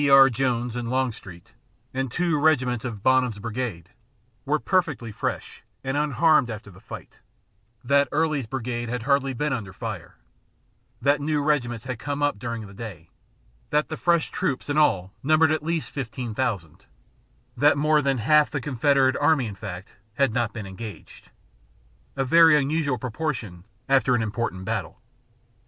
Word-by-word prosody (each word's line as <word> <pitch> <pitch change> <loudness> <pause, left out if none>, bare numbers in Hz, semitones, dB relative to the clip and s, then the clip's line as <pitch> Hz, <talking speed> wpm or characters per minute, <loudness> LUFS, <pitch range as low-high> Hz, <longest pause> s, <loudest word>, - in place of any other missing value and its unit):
R. 135 -1 +8
Jones 120 -1 -1
and 120 -1 -3
Longstreet, 115 -7 -3 0.4
and 135 -2 -2
two 170 0 +1
regiments 130 -6 +2
of 110 -6 -6
Bonham's 130 -4 +3
brigade, 105 -5 -4 0.6
were 150 +2 +2
perfectly 155 - 0
fresh - - -4 0.2
and 135 +1 -2
unharmed 150 -1 +3
after 105 -2 -7
the 90 - -16
fight; - - -11 0.6
that 140 +3 +3
Early's 150 -5 0
brigade 120 -1 -3
had 125 -1 -3
hardly 140 0 +2
been 150 +3 -1
under 110 -7 -4
fire; 90 - -7 0.9
that 145 +1 +3
new 150 +1 0
regiments 120 -6 0
had 125 -3 -4
come 145 +2 -3
up 145 -8 +1
during 115 -1 -4
the 100 - -12
day; 95 -7 -9 0.6
that 150 +1 +1
the 155 - -3
fresh 170 0 +1
troops 140 +1 -2
in 145 - 0
all 95 -10 +2
numbered 155 +3 +4
at 155 - 0
least 165 +1 -2
fifteen 125 -3 -5
thousand; 105 - -3 0.7
that 145 0 +4
more 150 +1 +3
than 135 -1 +1
half 150 +6 +4
the 145 - -2
Confederate 135 0 +2
army, 145 -3 +3
in 105 - -5
fact, 100 -2 -8 0.2
had 135 -3 +2
not 120 -3 0
been 115 -4 -7
engaged 100 +3 -10 0.9
a 135 -1 0
very 165 +2 +7
unusual 145 -1 0
proportion 115 - -4 0.2
after 135 -2 +3
an 120 - +1
important 105 -4 -3
battle. 100 -6 -3
130 Hz, 155 wpm, -25 LUFS, 115-145 Hz, 0.9 s, R